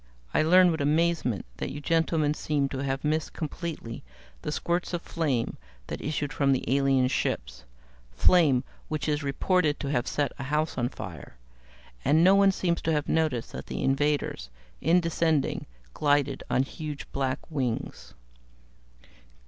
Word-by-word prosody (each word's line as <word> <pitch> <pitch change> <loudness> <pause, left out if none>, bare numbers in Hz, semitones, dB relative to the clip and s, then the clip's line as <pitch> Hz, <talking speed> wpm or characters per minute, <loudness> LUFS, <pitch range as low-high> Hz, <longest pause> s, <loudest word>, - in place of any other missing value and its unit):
I - - +4
learn 180 +3 +6
with 160 -2 -2
amazement 150 - +1
that - - -3
you 140 +2 -6
gentlemen 160 -1 +1
seem 145 -2 -1
to 135 - -4
have 135 0 -2
missed 155 0 0
completely 155 -6 -5 0.4
the - - -3
spurts 175 +3 -1
of 175 - -5
flame 140 -8 -1 0.3
that - - -6
issued 150 -1 -2
from 140 -2 +3
the 130 - -1
alien 135 -2 +3
ships 130 - -2 0.4
flame 135 - +4 0.2
which 155 -1 -3
is 150 0 0
reported 150 +3 +1
to 140 - -3
have 120 -4 0
set 145 -1 0
a 135 - -4
house 150 +3 0
on 120 -1 0
fire. 90 - -9 0.7
And 155 +4 +4
no 190 +2 +7
one 200 0 +6
seems 175 -2 -1
to 165 - 0
have 150 -1 0
noticed 155 -8 0
that - - -7
the - - -4
invaders, 135 - 0 0.3
in 170 +4 +4
descending, 160 -3 0 0.3
glided 145 -2 +1
on 130 - +3
huge 150 +1 -6
black 135 -1 -1
wings." 130 -6 -3
150 Hz, 155 wpm, -27 LUFS, 135-160 Hz, 0.7 s, no